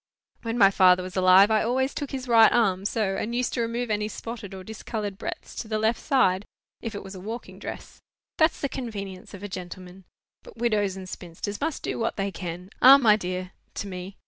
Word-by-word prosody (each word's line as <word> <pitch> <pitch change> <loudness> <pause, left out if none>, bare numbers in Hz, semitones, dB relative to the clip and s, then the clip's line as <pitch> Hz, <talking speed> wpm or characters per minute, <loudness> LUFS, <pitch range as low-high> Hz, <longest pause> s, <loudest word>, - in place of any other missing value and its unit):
"When 230 0 -3
my 200 -4 +6
father 185 -1 +5
was 185 0 -8
alive, 185 +2 +6
I 215 - +4
always 260 +4 0
took 290 - -4
his 260 -1 -5
right 230 -2 +7
arm, 195 -5 +2
so, 205 -2 0
and 235 +2 -3
used 250 0 0
to 240 - 0
remove 230 0 -2
any 210 0 0
spotted 225 -1 -7
or 190 -1 -8
discoloured 215 -1 -5
breadths - - -6
to 225 - -4
the 215 0 -1
left 220 +2 +1
side, 205 -10 +2 0.4
if 230 -3 -5
it - - -6
was 190 0 -9
a 190 - -8
walking 225 +6 -7
dress. - - -8 0.4
That's 315 +1 +3
the 280 - +1
convenience 200 -9 -6
of 195 - -11
a - - -3
gentleman. 185 0 -9 0.4
But - - -15
widows 210 -5 0
and 190 -1 -8
spinsters 185 +5 -6
must 315 0 -2
do - - -3
what 225 - -1
they 195 0 -2
can. 180 +1 -7
Ah, 265 +2 +10
my 225 -6 +5
dear 185 -2 -4 0.2
(to - - -4
me)! 185 +1 -7
205 Hz, 215 wpm, -26 LUFS, 185-230 Hz, 0.4 s, Ah